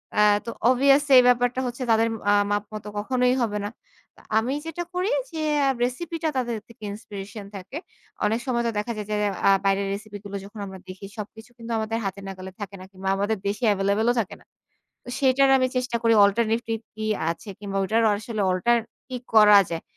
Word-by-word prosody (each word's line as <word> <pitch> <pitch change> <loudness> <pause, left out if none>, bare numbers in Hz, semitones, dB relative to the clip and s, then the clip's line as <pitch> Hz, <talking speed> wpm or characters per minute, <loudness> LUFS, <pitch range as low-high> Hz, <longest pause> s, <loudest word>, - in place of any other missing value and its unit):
অ্যা 210 - +5 0.2
তো 230 - -4 0.2
অবভিয়াসলি 275 +2 +4
এই - - +6
ব্যাপারটা 245 0 +3
হচ্ছে 245 +2 -5
তাদের 225 0 +4 0.2
আ - - +5 0.2
মাপ 205 0 +1
মতো 210 -1 -7
কখনোই 250 +4 +1
হবে 215 -3 0
না। - - -2 0.7
আমি 235 +4 +1
যেটা 325 +2 -4
করি 365 +3 0 0.2
যে, 320 - -4 0.3
আ - - +4
রেসিপি 305 +7 -2
টা 320 - +2
তাদের 240 -3 -1
থেকে 230 -2 -16
ইন্সপিরেশন 205 0 -8
থাকে। 195 +9 -7 0.5
অনেক 220 +2 +1
সময় 235 -2 0
তো - - 0
দেখা 210 +3 -2
যায় 210 - -4
যে, - - +1 0.3
আ - - +7 0.2
বাইরের 195 0 +2
রেসিপি 205 0 -7
গুলো 200 0 -6
যখন 205 +2 -11
আমরা 190 -1 -9
দেখি 185 +1 -9
সবকিছু 220 +2 -8
কিন্তু 230 0 -8
আমাদের 220 +1 -1
হাতে 195 +1 -3
নাগালে 190 -1 -7
থাকে 200 0 -6
না। 185 - -10
কিংবা 190 0 -4
আমাদের 205 +3 0
দেশে 205 +5 -3
এভেইলেবল 200 +3 +1
ও - - +1
থাকে 205 - -3
না। - - -23 0.6
তো - - -14
সেটার 270 0 +4
আমি 255 -1 +2
চেষ্টা 250 -1 0
করি 230 -1 +4
অল্টারনেটিভ 225 +2 +1 0.2
কি 220 0 -5 0.3
আছে 170 +6 -7
কিংবা 200 -1 -5
ওইটার 220 +4 +2
আসলে 215 0 -3
অল্টার 235 +6 +3 0.3
কি 255 - -4 0.2
করা 210 -2 +8
যায়। 165 -1 -3
220 Hz, 200 wpm, -24 LUFS, 200-245 Hz, 0.7 s, করা